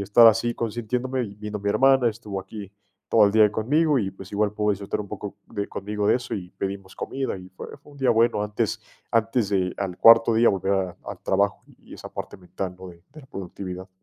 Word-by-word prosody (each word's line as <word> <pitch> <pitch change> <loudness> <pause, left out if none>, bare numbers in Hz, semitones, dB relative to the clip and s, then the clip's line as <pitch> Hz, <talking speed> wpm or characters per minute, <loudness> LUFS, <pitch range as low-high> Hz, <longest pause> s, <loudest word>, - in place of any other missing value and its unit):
estar 105 +4 +6
así 115 +2 +4
consintiéndome, 120 +3 -2 0.2
vino 105 0 -5
mi 100 0 -1
hermana, 130 +2 +4
estuvo 105 -3 -7
aquí 100 +1 -8 0.4
todo 110 -2 +5
el 100 - +3
día 110 -1 +5
conmigo, 145 +8 +2
y 100 -5 -1
pues, 95 -1 -12
igual 105 0 +1
pudo 105 0 -1
disfrutar 100 +1 -4
un 100 - -7
poco 100 0 -7
de 100 -1 -4
conmigo 105 +1 -3
de - - +4
eso, 125 -1 -5
y 90 -3 -6
pedimos 95 0 -5
comida, 135 -7 -4
y 90 0 -12
fue - - -8
fue 145 - -18
un - - -15
día 130 -2 +3
bueno, 115 -2 +3
antes 105 0 -2 0.3
antes 115 -1 +1
de 95 -3 0
al 95 -3 -3
cuarto 115 +1 +7
día 115 +1 +5
volver 95 0 -1
a 95 -2 -2
al - - -6
trabajo 100 -2 +1 0.2
y - - -13
esa - - -10
parte - - -6
mental, 90 0 -6
¿no? 95 0 -9
De 85 - -12 0.2
de 155 - -10
la - - -16
productividad. 95 -1 -7
105 Hz, 220 wpm, -24 LUFS, 95-115 Hz, 0.4 s, cuarto